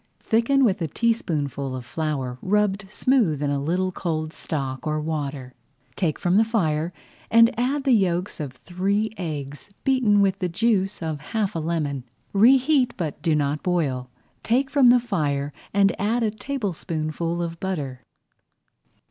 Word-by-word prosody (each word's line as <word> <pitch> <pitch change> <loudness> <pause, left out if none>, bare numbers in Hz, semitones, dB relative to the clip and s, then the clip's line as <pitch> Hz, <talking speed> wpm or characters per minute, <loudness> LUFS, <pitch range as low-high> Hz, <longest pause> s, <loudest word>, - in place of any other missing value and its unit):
Thicken 240 +5 +2
with 200 -4 +1
a 165 - 0
teaspoonful 145 - -1
of 125 -1 -6
flour, 135 -4 -3
rubbed 200 0 +1
smooth 210 - +2
in 145 - 0
a 140 -1 0
little 180 +5 0
cold 155 -3 -3
stock 135 -3 -4
or 155 0 0
water, 145 -4 -4 0.4
take 165 -6 0
from 180 +2 +2
the 220 - +6
fire, 170 -8 0 0.4
and 230 0 +6
add 270 +4 0
the 270 - +2
yolks 185 -5 +1
of 145 -4 -4
three 195 +9 -1
eggs 145 -3 -5
beaten 250 -6 +3
with 195 -2 +2
the 180 - -1
juice 195 -1 0
of 155 -3 -3
half 210 +5 -2
a - - 0
lemon. 155 -5 -2 0.3
Reheat, 255 +5 +4
but 160 -6 -4
do 165 -3 +2
not 145 0 0
boil. 140 -9 -1 0.3
Take 265 +4 +1
from 275 -4 +6
the 245 +1 +6
fire 145 -11 -1 0.2
and 200 -1 +3
add 230 +4 +1
a 215 - +1
tablespoonful 170 - -3
of 165 -1 -5
butter. 145 -10 -3
175 Hz, 155 wpm, -24 LUFS, 150-220 Hz, 0.4 s, the